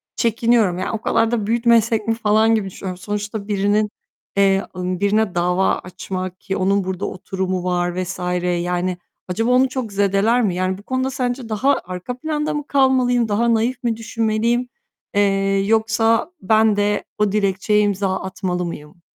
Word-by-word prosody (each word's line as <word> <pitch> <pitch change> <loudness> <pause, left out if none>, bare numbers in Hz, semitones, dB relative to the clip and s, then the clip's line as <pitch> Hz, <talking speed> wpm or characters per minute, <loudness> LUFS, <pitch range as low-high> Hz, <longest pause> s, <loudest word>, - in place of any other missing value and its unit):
çekiniyorum. 230 -5 +2
Yani - - -2
o 225 -1 -4
kadar 225 +1 +1
da 215 -4 -1
büyütmesek 230 -1 +2
mi 225 - +3
falan 220 0 +3
gibi 205 -3 -1
düşünüyorum. 185 -1 -6
Sonuçta 205 +1 -4
birinin, 205 +1 +1 0.5
eee, 195 0 +4
ımm, 180 0 -3
birine 205 -2 +1
dava 180 +2 +2
açmak 185 0 -6
ki 195 - -3
onun 195 +1 +2
burada 190 +1 -3
oturumu 185 -1 -3
var 175 0 -1
vs. 185 +1 -6 0.4
Yani 180 0 -1 0.3
acaba 225 +7 0
onu 255 +1 +4
çok 250 -6 -4
zedeler 200 +5 +2
mi? 190 -6 0
Yani 185 +1 -1
bu 205 - -14
konuda 260 +2 -1
sence 245 -2 -3
daha 265 +6 +2
arka 185 +7 -6
planda 300 +1 -2
mı 295 -1 -4
kalmalıyım, 255 -4 +3
daha 230 +3 +2
naif 240 +3 0
mi 230 -2 0
düşünmeliyim, 230 +2 0 0.5
eee, 195 -1 +2
yoksa 225 - +2
ben 220 +1 +3
de 205 0 0
o 210 -2 +1
dilekçeye 205 0 +1
imza 200 -2 0
atmalı 180 -1 -3
mıyım? 150 0 -8
210 Hz, 160 wpm, -20 LUFS, 190-230 Hz, 0.5 s, eee